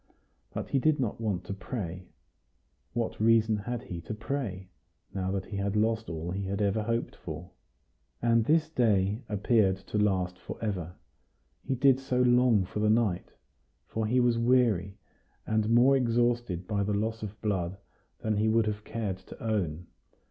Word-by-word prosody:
But - - -5
he 135 - +2
did 155 +2 +2
not 115 -3 -2
want 100 -5 -1
to - - -5
pray. 95 -3 -5 0.9
What 115 -1 -2
reason 110 -1 +4
had 115 +3 -4
he 85 -2 -6
to 110 - -6
pray, 110 -6 -4 0.5
now 95 -1 -2
that 95 0 -2
he 100 - -6
had 100 +1 -1
lost 110 +1 +1
all 80 +1 -4
he 95 +2 -3
had 95 +1 -2
ever 105 +1 +1
hoped 115 +2 -2
for? - - -8 0.7
And 115 -1 +3
this 160 +6 +3
day 105 -7 +2
appeared 105 -2 +2
to 100 +2 -3
last 90 -3 +1
for 85 - -7
ever. 90 -5 -3 0.7
He 135 - -1
did 135 0 +4
so 130 -2 -1
long 125 -5 +4
for 105 - -5
night! 105 -5 +1 0.5
for 110 -1 -2
he 125 +3 +3
was 120 -1 +3
weary, 115 -6 +2 0.5
and 110 0 +1
more 120 +4 +6
exhausted 120 -6 +1
by 105 -2 0
the 100 +1 0
loss 110 +2 -1
of 105 0 -6
blood 95 -3 -1 0.4
than 110 -1 0
he 110 +1 +2
would 115 0 +3
have 105 -1 -3
cared 105 -5 -3
to - - -13
own. 90 -7 -1
110 Hz, 170 wpm, -29 LUFS, 95-120 Hz, 0.9 s, more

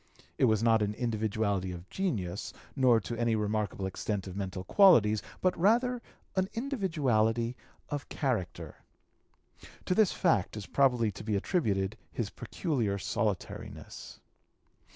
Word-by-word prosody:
It - - +5
was 110 -2 +2
not 115 -1 +4
an 105 0 0
individuality 110 -5 -1
of 90 +1 -8
genius 105 - -2 0.2
nor 125 -4 +5
to 120 - -5
any 115 -1 +2
remarkable 105 -2 -1
extent 95 +1 -3
of 95 -1 -7
mental 95 -2 -4
qualities; 110 - +5 0.2
but 185 -1 +2
rather 240 +6 +2 0.3
an 190 0 +1
individuality 135 - 0 0.3
of 145 -2 -4
character. 125 - -2 1.1
To - - +1
this 210 0 +4
fact 110 - +1
is 105 - -5
probably 125 -5 +2
to 100 - -9
be 105 -1 -1
attributed 100 - 0
his 110 -5 -3
peculiar 120 - -2
solitariness. 100 +1 -4
110 Hz, 130 wpm, -30 LUFS, 100-145 Hz, 1.1 s, It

